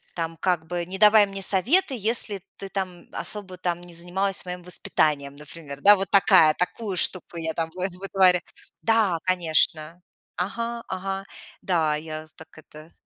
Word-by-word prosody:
там, 165 Hz, -1 st, -4 dB
как 175 Hz, -1 st, -1 dB
бы, 175 Hz, 0 st, -3 dB
не 185 Hz, +2 st, -6 dB
давай 210 Hz, +1 st, +6 dB
мне 195 Hz, 0 st, -7 dB
советы, 260 Hz, -, +4 dB
если 215 Hz, -2 st, 0 dB, 0.2 s
ты 195 Hz, -, -8 dB
там, 185 Hz, -3 st, -4 dB
м, -, -, -24 dB
особо, 195 Hz, -3 st, -3 dB
там, 175 Hz, -1 st, -3 dB
не 175 Hz, -1 st, -11 dB
занималась 185 Hz, +4 st, 0 dB
моим 180 Hz, 0 st, -6 dB
воспитанием, 150 Hz, -5 st, 0 dB
например, 145 Hz, -1 st, -9 dB
да. 205 Hz, +1 st, +8 dB
Вот 190 Hz, -1 st, -3 dB
такая, 165 Hz, -5 st, +5 dB
такую 195 Hz, +3 st, -3 dB
штуку 180 Hz, 0 st, 0 dB
я 160 Hz, -1 st, -3 dB
там 165 Hz, 0 st, -3 dB
выт 185 Hz, +1 st, -2 dB
вытворя 190 Hz, -2 st, +3 dB, 0.4 s
Да, 220 Hz, -6 st, +2 dB
конечно, 165 Hz, -2 st, 0 dB, 0.4 s
ага, 230 Hz, +5 st, -4 dB
ага. 195 Hz, +1 st, -4 dB, 0.4 s
Да, 160 Hz, -5 st, +1 dB
я 155 Hz, 0 st, -8 dB
з -, -, -23 dB
так 160 Hz, 0 st, -14 dB
это 155 Hz, +1 st, -14 dB
180 Hz, 165 wpm, -24 LUFS, 165-195 Hz, 0.4 s, да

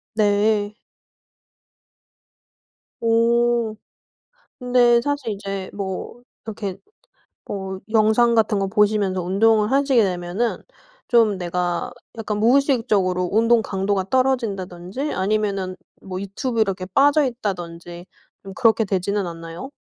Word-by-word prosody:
네. 210 Hz, 0 st, +1 dB, 2.3 s
오. 230 Hz, 0 st, +2 dB, 0.8 s
근데 245 Hz, -1 st, +4 dB
사실 285 Hz, -4 st, -2 dB
이제 195 Hz, -1 st, -5 dB
뭐 200 Hz, +4 st, -6 dB, 0.2 s
이렇게 205 Hz, -3 st, -5 dB, 0.7 s
뭐 190 Hz, -1 st, -5 dB
영상 225 Hz, +2 st, +4 dB
같은 215 Hz, -2 st, +2 dB
거 195 Hz, -, 0 dB
보시면서 205 Hz, -2 st, +1 dB
운동을 210 Hz, +4 st, +2 dB
하시게 270 Hz, -3 st, +3 dB
되면은 185 Hz, +4 st, -2 dB, 0.5 s
좀 225 Hz, -4 st, +3 dB
내가 175 Hz, -1 st, -2 dB, 0.3 s
약간 210 Hz, -2 st, -3 dB
무의식적으로 220 Hz, -8 st, +2 dB
운동강도가 205 Hz, -4 st, +1 dB
떨어진다든지 230 Hz, -2 st, -1 dB
아니면은 195 Hz, -1 st, -1 dB, 0.3 s
뭐 185 Hz, -1 st, -6 dB
유튜브 220 Hz, +4 st, -2 dB
이렇게 190 Hz, -3 st, -1 dB
빠져있다든지 195 Hz, -, 0 dB, 0.4 s
좀 195 Hz, -1 st, -9 dB
그렇게 225 Hz, -3 st, +3 dB
되지는 195 Hz, +1 st, -1 dB
않나요? 165 Hz, +7 st, -8 dB
210 Hz, 240 characters per minute, -22 LUFS, 190-235 Hz, 2.3 s, 근데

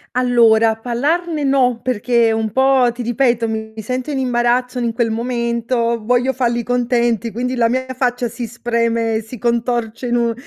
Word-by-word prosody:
Allora 230 Hz, -3 st, +4 dB
parlarne 295 Hz, +7 st, -1 dB
no, 255 Hz, -3 st, +2 dB
perché 235 Hz, -1 st, +1 dB
un 220 Hz, -1 st, -2 dB
po' 265 Hz, +1 st, +3 dB
ti 245 Hz, -, -7 dB
ripeto, 240 Hz, -1 st, +1 dB
mi 220 Hz, 0 st, -4 dB
sento 255 Hz, +6 st, -4 dB
in 275 Hz, -, -2 dB
imbarazzo 250 Hz, 0 st, 0 dB
n -, -, -1 dB
in 235 Hz, -, 0 dB
quel 230 Hz, 0 st, 0 dB
momento, 235 Hz, 0 st, -1 dB
voglio 245 Hz, +3 st, +1 dB
falli 240 Hz, -2 st, 0 dB
contenti, 240 Hz, -2 st, 0 dB
quindi 250 Hz, +2 st, -3 dB
la 230 Hz, -1 st, +2 dB
mia 260 Hz, +2 st, -1 dB
faccia 245 Hz, -1 st, 0 dB
si 235 Hz, +1 st, -6 dB
spreme 230 Hz, -1 st, -1 dB
e 220 Hz, -, -1 dB
si 225 Hz, +3 st, -10 dB
contorce 235 Hz, 0 st, -1 dB
in 240 Hz, 0 st, +1 dB
un 235 Hz, -1 st, +1 dB
240 Hz, 170 wpm, -18 LUFS, 230-250 Hz, -, Allora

